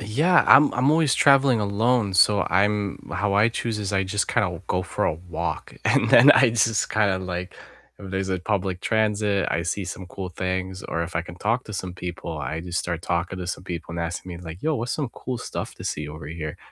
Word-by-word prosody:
Uh, - - -6
yeah, 155 +12 +3
I'm 145 +1 +7
I'm 130 +3 +2
always 155 -3 +3
traveling 135 -4 +4
alone, 105 +1 +1
so 100 +1 +4
I'm 100 +1 +1
how 100 +1 0
I 105 +3 +5
choose 115 -1 -3
is 100 -2 -3
I 95 -1 +1
just 100 +2 -1
kinda 105 - +2
w 90 -1 -6
go 90 - 0
for - - -2
a - - +1
walk, 85 +2 -5
and - - +3
then 135 +5 +8
I 130 -4 +6
just 115 -1 +1
kinda, 100 -3 +2
like 90 0 -5 0.4
if 95 -2 -9
there's 95 0 -2
a 95 - 0
public 95 -1 -2
transit, 105 -2 +1
I 85 - 0
see 90 +4 -2
some 95 0 -7
cool 90 0 -7
things, 95 +1 -3
or 85 - -2
if 85 0 -6
I 80 - +1
can 85 - -10
talk 115 +7 -1
to 105 - -9
some 95 -1 -4
people, 85 -3 -6
I 75 +3 -4
just 90 +1 -3
start 85 -1 -3
talking 85 +2 -2
to 90 - -5
some 90 0 -5
people 85 -2 -6
and 85 - -4
asking 85 +2 -4
me 85 - -7
like, 85 0 -9
"Yo, 155 0 +1
what's 120 -2 -2
some 145 -6 -3
cool 130 +2 -5
stuff - - -6
to - - -10
see 75 0 -3
over 75 0 -9
here?" 80 +1 -6
95 Hz, 235 wpm, -24 LUFS, 90-110 Hz, 0.4 s, then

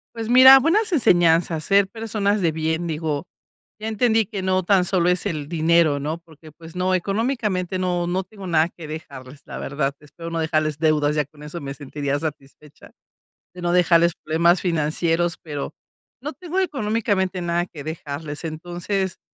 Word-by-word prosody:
Pues 225 -1 -4
mira, 260 +2 +9
buenas 395 - +2
enseñanzas, 170 - +3
ser 200 -1 +3
personas 210 -2 -1
de 165 -2 +2
bien, 160 +2 -2
digo, 155 -1 -3 0.5
ya 220 - -5
entendí 225 -1 +2
que 200 -2 -5
no 185 0 +1
tan 190 0 +3
solo 180 -2 +1
es 180 +2 +1
el 155 -7 -3
dinero, 165 -3 +3
no, 155 +3 -3
porque, 160 -2 -17
pues 165 +2 -14
no, 185 +1 0
económicamente 195 -2 -1
no, 175 -1 -1
no 185 +2 -1
tengo 200 -3 -11
nada 160 -1 +3
que 165 -3 -11
dejarles. 140 -3 -9
La - - -8
verdad, 140 0 -2
espero 165 +3 -9
no 165 - -3
dejarles 155 -2 0
deudas. 150 -2 +2
Ya 150 - +2
con 150 +1 -17
eso 150 +3 -7
me 140 -1 -5
sentiría 145 0 -3
satisfecha, 150 -1 -9 0.6
de 180 - -9
no 175 0 0
dejarles 170 -1 +4
problemas 170 +3 +2
financieros, 165 0 0
pero 150 -1 -5 0.5
no 300 +3 -5
tengo 365 +1 -3
económicamente 210 - -1
nada 175 +1 -1
que 150 -5 -10
dejarles. 150 0 -6
Entonces, 175 +4 -3
170 Hz, 170 wpm, -22 LUFS, 155-195 Hz, 0.6 s, mira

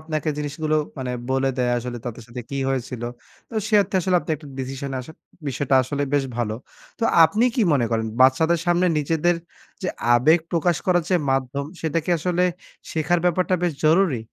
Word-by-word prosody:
আপনাকে 155 0 -3
জিনিসগুলো 155 +1 -1 0.2
মানে 125 -1 -3 0.2
বলে 135 0 +2
দেয় 125 -1 +1
আসলে 120 0 -5
তাদের 120 -1 -6
সাথে 125 +1 -6
কি 140 - -3
হয়েছিল। 130 -2 -3 0.5
তো - - -12
সে 215 - 0
অর্থে 195 +1 -10
আসলে 180 +1 +2
আপনি - - -7
১ - - -8
টা - - -10
ডিসিশনে 135 +1 -4
আসেন। 155 +5 -12 0.3
বিষয়টা 135 +1 0
আসলে 140 +3 -3
বেশ 140 -1 +2
ভালো। 115 -3 -1 0.4
তো 230 - 0 0.2
আপনি 215 +8 +2
কি 235 - +2
মনে 130 -5 +2
করেন? 110 -1 0
বাচ্চাদের 160 +6 +4
সামনে 175 +1 +3
নিজেদের 165 +3 +1 0.5
যে - - -1 0.3
আবেগ 155 +8 +5
প্রকাশ 170 0 +2
করার 175 -2 +3
যে 185 - +5
মাধ্যম, 135 +1 -1 0.2
সেটা 160 0 0
কি - - -2
আসলে 180 +2 0 0.5
শেখার 160 +2 +1
ব্যাপারটা 180 +1 +2
বেশ 175 - +1
জরুরি? 160 -6 +3
150 Hz, 185 wpm, -23 LUFS, 130-175 Hz, 0.5 s, আবেগ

